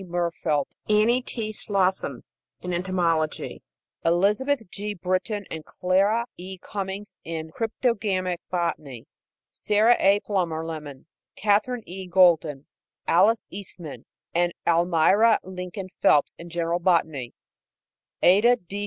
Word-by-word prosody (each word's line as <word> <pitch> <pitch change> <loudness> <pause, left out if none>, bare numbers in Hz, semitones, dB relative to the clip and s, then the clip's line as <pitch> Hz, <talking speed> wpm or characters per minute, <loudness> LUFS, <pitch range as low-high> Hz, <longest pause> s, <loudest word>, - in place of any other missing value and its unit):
Murfeldt, 170 -4 -2
Annie 220 +4 +4
T. 225 -3 -4
Slosson 190 - -1 0.4
in 180 0 -4
entomology; 175 -3 -1 0.4
Elizabeth 210 +9 +1
G. 205 +1 -5
Britton 185 +3 -2
and 160 -1 -5
Clara 200 +8 +1
E. 185 +2 -8
Cummings 195 +1 -6
in 160 -1 -5
cryptogamic 205 -5 -1
botany; 155 -8 -3 0.5
Sarah 215 +3 +3
A. 200 +1 +4
Plummer 170 -6 -1
Lemmon, 150 -4 -7 0.3
Katherine 215 +4 +1
E. 185 +1 -8
Golden, 165 -6 +3 0.4
Alice 210 +7 +4
Eastman 180 -5 -8 0.3
and 175 0 +1
Almira 175 +6 +4
Lincoln 185 +1 -7
Phelps 145 - +4
in 170 +1 -9
general 170 0 -1
botany; 160 -8 0 0.9
Ada 210 +7 +6
D. 200 -2 -8
185 Hz, 110 wpm, -25 LUFS, 170-205 Hz, 0.9 s, Ada